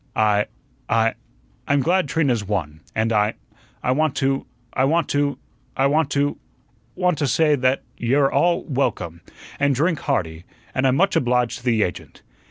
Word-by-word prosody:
"I 105 -1 +2 0.4
I 115 0 +2 0.5
I'm 140 0 +3
glad 180 +3 +2
Trina's 125 -6 +1
won, 85 -7 -3 0.2
and 110 +1 +1
I 105 +1 +2 0.5
I 125 - +1
want 155 +2 +1
to 135 0 0 0.3
I 130 - +1
want 160 +4 +2
to 145 0 0 0.4
I 135 - +3
want 150 +1 +2
to 145 0 0 0.6
want 180 -4 +1
to 145 - +1
say 150 +3 +3
that 130 -1 +1 0.2
you're 135 +4 +2
all 175 0 +2
welcome, 90 - -2 0.4
an' 140 0 +3
drink 155 +4 +1
hearty, 85 - -2 0.3
an' 130 - 0
I'm 130 - +3
much 195 +5 +2
obliged 125 -1 +1
to 120 - -18
the 115 -3 +3
agent. 90 - -6
135 Hz, 165 wpm, -22 LUFS, 115-145 Hz, 0.6 s, I'm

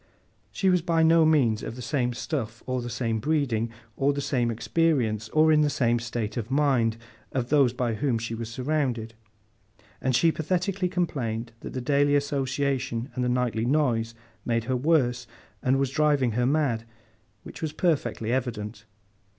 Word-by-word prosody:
She 190 -1 +2
was 180 -1 +3
by 165 -1 +2
no 165 0 +5
means 125 -9 +3
of - - -6
the 125 - -8
same 125 -2 0
stuff, 120 -6 -4
or 130 -1 -2
the 120 - -5
same 115 -2 -1
breeding, 120 -5 0 0.3
or 140 +1 +2
the 140 - -3
same 125 -4 0
experience, 115 -4 0
or 155 +3 +4
in 155 -1 +5
the 150 - +3
same 120 -4 +1
state 115 -1 -4
of 115 -1 -3
mind, 130 -5 +2 0.4
as 125 -2 -1
those 140 -4 +4
by 120 -1 -1
whom 125 +1 0
she 115 +1 -4
was 115 0 -5
surrounded; 125 -3 -2 0.9
and 130 -2 +1
she 165 +6 +4
pathetically 180 +4 -1
complained 120 -11 -2
that - - -8
the 130 - -3
daily 145 +2 +2
association 135 -3 -1
and 125 0 -2
the 125 - +1
nightly 120 -2 0
noise 120 -6 +1 0.3
made 115 -1 0
her 130 +2 -1
worse, 125 -3 +1 0.3
and 130 +1 +2
was 135 -1 0
driving 145 -4 +2
her 120 +3 +1
mad—which 115 -7 -4
was 160 -2 -2
perfectly 130 -9 0
evident. 115 -4 -3
130 Hz, 165 wpm, -26 LUFS, 115-150 Hz, 0.9 s, no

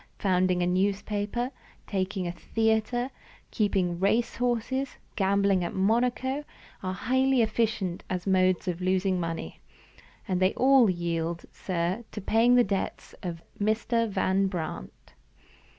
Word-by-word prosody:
Founding 185 -2 +2
a - - +2
newspaper, 205 +6 0 0.3
taking 190 -1 -2
a 175 - -2
theater, 225 +6 0 0.4
keeping 190 -5 0
race 220 +5 +1
horses, 250 +2 -1 0.2
gambling 195 -1 +2
at - - -4
Monaco, 245 +7 +1 0.4
are 185 0 -2
highly 260 +3 +2
efficient 215 -5 -1
as 180 -1 -3
modes 185 -1 +2
of 180 0 -2
losing 185 0 +1
money. 165 - -4 0.7
But 185 -1 0
they 185 +1 +3
all 260 -3 +5
yield, 170 -1 -2
sir, 180 +4 -2
to - - -4
paying 225 +5 +4
the 245 - +6
debts 195 -3 -3
of 170 -2 -5 0.2
Mr. 225 +2 +1
Van 195 0 +1
Brandt!" 160 - -6
195 Hz, 125 wpm, -28 LUFS, 185-230 Hz, 0.7 s, the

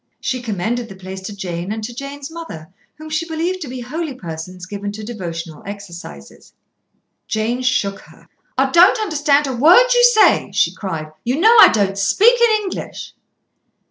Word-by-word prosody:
She 255 -1 -3
commended 230 +2 -3
the 195 - -10
place 190 0 -8
to 200 +2 -7
Jane, 180 -1 -5
and 220 0 -4
to 240 +3 -6
Jane's 275 +3 -8
mother, 190 - -9 0.2
whom 310 +1 -11
she 310 +2 -2
believed 340 +3 -2
to 300 - -5
be 255 0 -7
holy 300 +3 -5
persons 180 -2 -8
given 205 +1 -5
to 215 +1 -8
devotional 170 -8 -7
exercises. 175 - -10 0.7
Jane 225 +3 -1
shook 215 -6 0
her. - - -19 0.3
"I 265 0 +2
don't 355 - +6
understand 295 -7 +1
a 265 - -3
word 360 - +6
you 485 0 +4
say," 485 -3 +4
she - - +2
cried. 160 -6 -5
"You 250 +5 -1
know 445 +6 +6
I - - +11
don't. 200 -2 0
Speak 390 - +4
in 440 -3 +3
English." 380 - -7
240 Hz, 175 wpm, -19 LUFS, 190-315 Hz, 0.7 s, I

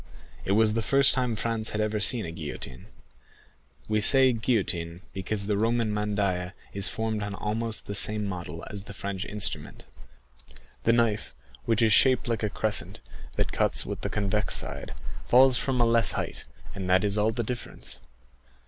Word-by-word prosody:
It 95 - +1
was 110 0 +3
the 115 - 0
first 135 +4 +5
time 125 -3 0
Franz 110 0 -1
had 105 - -3
ever 105 0 0
seen 110 +2 +3
a 85 - -5
guillotine,—we 70 - -8
say 130 +3 +6
guillotine, 95 -8 -1
because 100 +1 -3
the 100 -1 0
Roman 115 -1 +1
mandaïa 100 -4 -1 0.2
is 100 -1 +2
formed 110 -1 -2
on 100 -1 -4
almost 110 +2 -2
the 100 - -5
same 105 +1 +1
model 90 -4 -6
as 100 -1 -7
the 100 - -10
French 100 -1 -4
instrument.7 65 - -5 0.3
The 115 - +4
knife, 115 -3 0 0.3
which 115 0 +2
is 110 -2 +4
shaped 130 +2 +4
like 115 -2 -1
a 105 - 0
crescent, 110 +1 -2 0.4
that - - -1
cuts - - 0
with - - -5
the - - -3
convex 105 0 -1
side, - - -4 0.3
falls 130 0 +5
from 130 -2 -1
a 120 - +4
less 115 -2 +3
height, - - -4 0.3
and 95 -2 -5
that 95 +1 +4
is 100 -1 0
all 105 +1 +2
the 120 +1 -3
difference. 120 +1 -7
105 Hz, 170 wpm, -27 LUFS, 95-115 Hz, 0.4 s, say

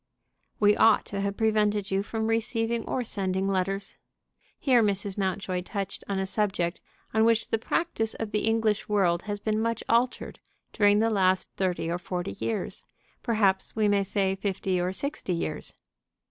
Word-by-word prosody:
"We 205 0 +5
ought 225 -1 +5
to 200 - -1
have 200 0 -2
prevented 210 -2 +1
you 195 0 +2
from 220 +2 -3
receiving 225 0 0
or 255 - 0
sending 190 -3 -1
letters." 195 +1 -1 0.6
Here 255 -4 +4
Mrs. 200 -2 0
Mountjoy 190 -2 -1
touched 195 +1 -5
on 200 - 0
a 190 - 0
subject 190 -4 -1 0.3
on 220 +1 +4
which 230 0 +2
the 225 - +1
practice 225 -4 -1
of 225 -2 -4
the 210 +1 0
English 225 -2 +1
world 180 -4 +2
has 205 0 -2
been 215 +1 0
much 230 0 -1
altered 240 +2 0 0.3
during 205 -2 +4
the 225 +1 +2
last 185 -2 +2
thirty 185 -3 -1
or 170 +1 -1
forty 180 - -4
years; 115 0 -3 0.4
perhaps 200 -4 +1
we 215 -1 +2
may 205 -1 +3
say 195 -1 0
fifty 190 -1 -1
or 180 +1 0
sixty 280 -2 -3
years. 165 - -4
205 Hz, 165 wpm, -27 LUFS, 190-225 Hz, 0.6 s, We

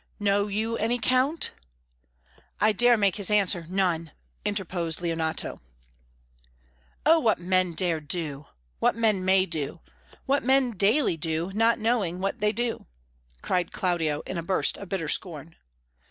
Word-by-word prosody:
"Know 205 0 +1
you 220 +3 -2
any, 230 +3 0
Count?" 255 +7 +1 1.1
"I 215 - +4
dare 240 +3 +4
make 200 -2 +1
his 200 -3 0
answer, 195 -5 +1
none," 180 -4 0 0.3
interposed 180 -5 -2
Leonato. 165 -2 -2 1.4
"Oh, 325 +2 +6
what 225 -7 +2
men 185 0 +1
dare 170 -2 +1
do! 150 -2 -4 0.3
what - - +2
men 215 -5 +1
may 190 0 +3
do! 155 -2 -4 0.5
what 280 +1 +1
men 265 0 +3
daily 205 - +2
do, 165 +2 -2
not 225 +2 +3
knowing 215 -6 0
what 195 +5 -2
they 210 0 +2
do!" 240 +1 -2 0.6
cried 180 -1 -1
Claudio, 165 -5 -1
in 185 - -5
a - - -2
burst 185 +3 +1
of 200 - -9
bitter 180 -5 -2
scorn. 160 -1 0
190 Hz, 140 wpm, -26 LUFS, 170-220 Hz, 1.4 s, Oh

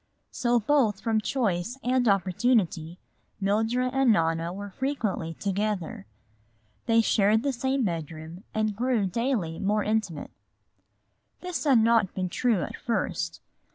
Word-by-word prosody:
So 240 -2 +1
both 225 -4 +2
from 225 -2 0
choice 215 -2 -1
and 250 0 +2
opportunity 185 -4 +1 0.4
Mildred 225 +6 +1
and 270 -2 +4
Nona 165 -2 +1
were 200 +2 -7
frequently 215 - -2
together. 200 - -2 0.8
They 230 -1 +5
shared 215 0 +3
the 280 -1 0
same 265 +2 0
bedroom 165 0 -5
and 215 -1 -1
grew 240 -2 +1
daily 200 -5 -1
more 210 +2 +1
intimate. 210 -8 -2 1.1
This 360 -3 -4
had 275 -4 +5
not 225 -4 +3
been 185 -1 -2
true 220 -2 +1
at - - -5
first. 185 -6 -2
215 Hz, 125 wpm, -27 LUFS, 180-245 Hz, 1.1 s, They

